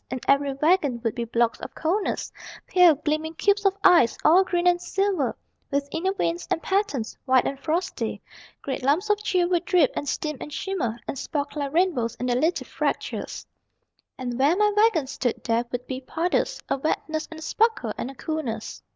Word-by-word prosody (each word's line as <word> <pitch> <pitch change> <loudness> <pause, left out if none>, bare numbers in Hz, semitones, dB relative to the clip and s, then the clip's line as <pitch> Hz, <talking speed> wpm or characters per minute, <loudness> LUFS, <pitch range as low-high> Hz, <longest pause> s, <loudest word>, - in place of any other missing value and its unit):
In 255 - -3
every 280 0 +3
wagon 290 -3 +2
would 225 -2 0
be 235 -1 -3
blocks 230 0 +1
of - - -8
coldness, 370 +6 -1 0.3
Pale, 360 -4 +6
gleaming 310 +1 -1
cubes 405 +2 +2
of 390 0 +3
ice, 340 -11 +6
all 355 +5 +7
green 350 -1 -1
and 350 0 +4
silver, 385 -9 0 0.3
With 280 0 -1
inner 370 +4 0
veins 345 -3 -2
and - - +1
patterns, 380 - -1
white 260 -2 +4
and 275 - -3
frosty; 330 +6 -2 0.4
Great 270 - -3
lumps 310 +11 +2
of 415 0 +1
chill 365 -4 +2
would 350 -1 +1
drip 350 -6 +3
and 285 - -2
steam 305 -2 -2
and 295 - -7
shimmer, 295 - -2
And 270 - -4
spark 285 -1 -3
like 285 -2 -2
rainbows 305 -9 +1
in 250 - -4
their 245 -1 +1
little 320 +8 +1
fractures. - - -3 0.7
And 245 -1 -4
where 290 +6 +4
my 420 0 +3
wagons 405 -11 +3
stood 245 -3 -2
there 230 +1 +1
would 245 0 -4
be 260 0 -5
puddles, 330 +7 -1
A - - 0
wetness 310 +2 -2
and 320 - -9
a - - -8
sparkle 430 - +1
and 250 - -4
a 270 - -10
coolness. 260 -7 -4
310 Hz, 190 wpm, -25 LUFS, 260-360 Hz, 0.7 s, all